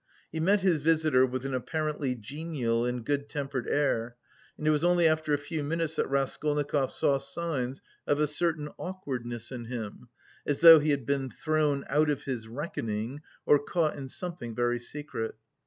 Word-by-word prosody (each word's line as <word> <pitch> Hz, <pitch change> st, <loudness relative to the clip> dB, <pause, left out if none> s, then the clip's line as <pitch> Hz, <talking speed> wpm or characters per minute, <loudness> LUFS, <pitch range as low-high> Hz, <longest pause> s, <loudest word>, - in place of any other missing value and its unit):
He 160 Hz, -, -3 dB
met 195 Hz, +5 st, +3 dB
his 180 Hz, -5 st, +3 dB
visitor 155 Hz, -4 st, +4 dB
with 130 Hz, +1 st, -4 dB
an 135 Hz, -, -2 dB
apparently 150 Hz, 0 st, -1 dB
genial 120 Hz, -1 st, -2 dB
and 125 Hz, -1 st, -3 dB
good 145 Hz, 0 st, -1 dB
tempered 135 Hz, -4 st, -3 dB
air, 120 Hz, -5 st, +1 dB, 0.4 s
and 150 Hz, -, -6 dB
it 155 Hz, -, +5 dB
was 150 Hz, +1 st, +1 dB
only 175 Hz, -1 st, +5 dB
after 155 Hz, -1 st, +1 dB
a 145 Hz, -, +4 dB
few 145 Hz, +1 st, -4 dB
minutes 160 Hz, +1 st, -1 dB
that -, -, 0 dB
Raskolnikov 140 Hz, 0 st, 0 dB
saw 140 Hz, -1 st, +2 dB
signs 140 Hz, -3 st, -3 dB, 0.2 s
of 145 Hz, -, +2 dB
a 150 Hz, -, +4 dB
certain 150 Hz, 0 st, 0 dB
awkwardness 125 Hz, -11 st, -5 dB
in 120 Hz, -2 st, -6 dB
him, 115 Hz, 0 st, -6 dB, 0.3 s
as 145 Hz, 0 st, -1 dB
though 165 Hz, -1 st, +11 dB
he 150 Hz, +1 st, 0 dB
had 140 Hz, -4 st, +1 dB
been 135 Hz, 0 st, 0 dB
thrown 150 Hz, -1 st, 0 dB
out 150 Hz, +2 st, +3 dB
of 145 Hz, -2 st, -1 dB
his 120 Hz, -5 st, -4 dB
reckoning 115 Hz, -1 st, -4 dB, 0.2 s
or 145 Hz, -, +6 dB
caught 160 Hz, 0 st, 0 dB
in 135 Hz, -2 st, -7 dB
something 165 Hz, -9 st, -6 dB
very 120 Hz, 0 st, +1 dB
secret. 120 Hz, -3 st, -5 dB
145 Hz, 175 wpm, -29 LUFS, 125-155 Hz, 0.4 s, though